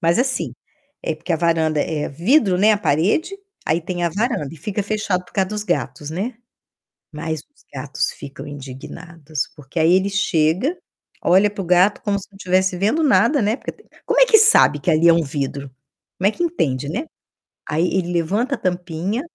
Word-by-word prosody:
mas 170 +3 +2
assim, 260 +1 0 0.5
é 160 - -1
porque 170 +3 -4
a - - +2
varanda 160 -2 +1
é 150 -2 -2
vidro, 190 - +2
né, 215 +3 +5
a 205 - +1
parede, 210 - +1 0.3
aí 165 +2 +1
tem 175 0 -3
a 170 - +1
varanda 210 - -1
e - - -10
fica 200 +7 -3
fechado 205 -3 -1
por - - -21
causa 190 -2 0
dos 210 0 -3
gatos, 145 - -2
né, 205 +9 -3 0.8
mas 155 0 -4
os 290 - -24
gatos 140 +2 -2
ficam 135 +1 -10
indignados, 145 +3 -7
porque 145 +2 -7
aí 160 +2 +4
ele 190 +2 +2
chega, 190 - +1 0.5
olha 195 +4 +4
para 205 -1 -5
o 180 - -7
gato 180 +3 +3
como 200 -2 0
se 190 - -9
não 195 - -18
estivesse 185 -1 +1
vendo 220 - +1
nada, 275 -1 +3
né, 210 +3 +1
porque, - - -7
te - - -24 0.2
como - - +2
é - - +8
que 450 -3 +7
sabe 430 - +5
que 175 - 0
ali 160 +2 +4
é - - +8
um 165 0 +2
vidro? 140 -1 -4 0.5
Como 190 - +3
é - - +2
que 345 - -4
entende, 145 - -1
né? 275 - -3 0.6
Aí 160 +3 +1
ele 180 -2 0
levanta 205 - 0
a - - -12
tampinha, 180 +4 -2
180 Hz, 200 wpm, -20 LUFS, 155-210 Hz, 0.8 s, é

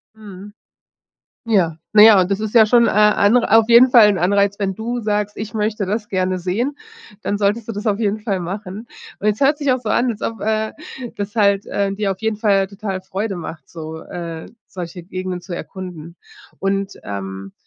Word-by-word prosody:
Mhm. 205 -2 -11 0.9
Ja, 175 -8 +2 0.2
na 210 - +7
ja 215 -2 +9
und 180 +2 -1
das 195 - 0
ist 220 +2 -4
ja 220 - +8
schon, 235 +2 +4
äh, 210 0 +4 0.2
auf 225 +1 +5
jeden 245 +2 +7
Fall 225 -4 +8
'n 200 - +1
Anreiz, 200 +2 +2
andere - - -39
wenn 195 -1 -1
du 235 +4 -4
sagst, 210 -1 -2
ich 215 -1 -6
möchte 215 -1 -1
das 210 +2 -3
gerne 185 -1 -1
sehen, 220 +11 -2 0.5
dann 205 - -2
solltest 210 +2 0
du - - -3
das 205 +2 -6
auf 210 0 +1
jeden 215 0 0
Fall 205 -3 -2
machen. 195 +5 -6 0.3
Und 210 - -1
es 210 0 +1
hört 290 +2 +3
sich 285 -3 +1
auch 255 - +2
so 225 - -5
an, 245 +3 +2
als 220 - -5
ob, 225 - -4
äh, 220 0 -1 0.4
das 205 +2 -5
halt, 200 -2 +2
äh, 200 -1 -1
dir 200 -1 -1
auf 190 - -6
jeden 220 -1 -1
Fall 200 -3 +2
total 195 -1 -5
Freude 195 +2 -4
macht, 170 -1 -8
so, 160 -1 -8
äh, 165 -2 -7 0.2
solche 175 -1 -8
Gegenden 185 0 -5
zu 175 0 -7
erkunden. 175 -4 -8 0.4
Und, 195 0 -1
ähm 95 -1 -6
205 Hz, 205 wpm, -19 LUFS, 185-220 Hz, 0.9 s, ja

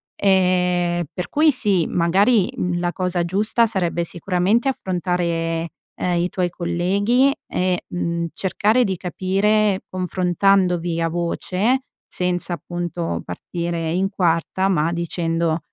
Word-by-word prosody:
Ehm, 180 -2 +2
per 180 - -4
cui 305 +1 +4
sì, 200 - +1
magari 190 +5 +3 0.3
la 175 0 0
cosa 180 -2 -1
giusta 210 +6 +2
sarebbe 180 -6 -1
sicuramente 180 - 0
affrontare, 170 -6 -1 0.3
ehm, 180 -1 -1
i 175 - 0
tuoi 180 -1 -1
colleghi 195 +10 +1
e, 180 -1 -1
mhmm, 170 -1 -2
cercare 210 +5 +2
di 195 -5 -1
capire 195 +3 +1
confrontandovi 180 -1 +1
a 165 - +1
voce, 185 +8 0 0.3
senza 180 0 -2
appunto 175 - -4
partire 170 - -4
in 190 +3 0
quarta, 180 0 0
ma 165 -3 +1
dicendo: 170 -1 -1
180 Hz, 115 wpm, -21 LUFS, 170-195 Hz, 0.3 s, cui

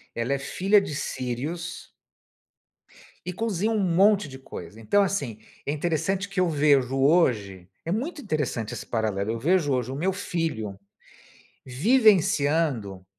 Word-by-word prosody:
ela 115 +4 -1
é 140 - -1
filha 195 +9 +3
de 175 -7 -5
sírios 145 +7 -4 1.4
e, 180 - -4
cozinham 220 +1 -1
um - - +1
monte 195 0 +3
de 130 -1 -10
coisa, 115 -4 -10
então, 200 - +3
assim, 140 - -2 0.3
é - - -1
interessante 170 +5 -1
que 195 -1 -3
eu 180 -1 +3
vejo 140 -4 +3
hoje 120 - +2 0.2
é 165 - -2
muito 280 - -3
interessante 150 - -2
esse - - -6
paralelo, 110 -2 -1
eu 115 - -3
vejo 160 +1 +2
hoje 125 0 -1
o - - -4
meu 185 +7 0
filho 160 - -3 0.9
vivenciando 150 - +2
150 Hz, 140 wpm, -25 LUFS, 125-190 Hz, 1.4 s, filha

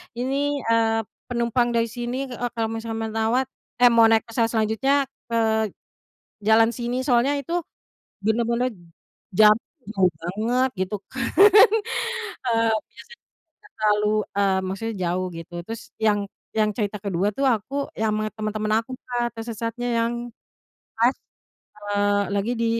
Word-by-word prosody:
ini, 275 +3 -1
eee, 225 0 +2 0.3
penumpang 240 0 +1
dari 230 0 +3
sini 240 0 -4 0.2
e 245 0 -4
kalau 225 -1 -1
misalnya 225 0 -4
menawat 225 +4 +1 0.4
eh, 245 - +8
mau 230 -1 +7
naik 225 0 +4
pesawat 230 0 0
selanjutnya 240 +6 +1 0.2
ke 230 - -1 1.1
jalan 225 +1 +5
sini 245 +2 -3
soalnya 260 +2 +3
itu, 305 +5 -5 0.7
bener-bener 235 +3 +1 0.7
jauh 215 0 +8 0.7
banget 230 +9 0
gitu 190 +3 -4
kan, - - -3 1.2
heeh, 230 -1 +2 0.2
biasanya 475 0 -15 0.4
gak 415 - -19
terlalu 210 0 +2 0.3
eee, 195 -1 +3
maksudnya 220 +3 -4
jauh 185 +2 -1
gitu 165 +1 -10
terus 225 0 -6 0.2
yang 205 -1 +3 0.4
yang 215 -1 +3
cerita 210 -1 -1
kedua 195 -1 -1
tuh 275 - +1
aku 245 +3 0 0.2
yang 220 -1 +1
ama 215 0 -1
temen-temen 215 0 -2
aku 260 - -12 0.2
Kak 240 -1 -1
tersesatnya 230 +1 -4
yang, 230 +1 +1 0.8
pas, 235 +3 +4 0.7
eee, 205 0 +1
lagi 205 +4 0
di 230 - +2
225 Hz, 130 wpm, -24 LUFS, 215-245 Hz, 1.2 s, eh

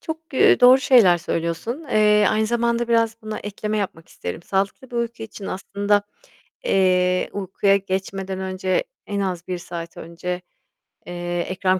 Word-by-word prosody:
Çok, 320 0 -5
eee, - - +5
doğru 255 +2 +8
şeyler 220 -11 +6
söylüyorsun. 170 - -3
Eee, 210 -1 +4
aynı 215 0 +1
zamanda 235 0 0
biraz 230 -1 +2
buna 215 0 -5
ekleme 210 +1 -3
yapmak 175 -5 -4
isterim. 90 - -6
Sağlıklı 200 +8 -2
bir 240 - -5
uyku 235 -1 -3
için 215 -2 -8
aslında, 200 +2 0 0.6
eee, 185 -1 +2
uykuya 195 0 +1
geçmeden 190 0 -3
önce 185 - -1 0.2
en 200 -1 -2
az 180 -3 -3
1 180 -1 -2
saat 170 -1 -7
önce, 180 +2 -5 0.6
eee, 175 0 -4
ekran 185 0 +1
195 Hz, 150 wpm, -22 LUFS, 180-220 Hz, 0.6 s, doğru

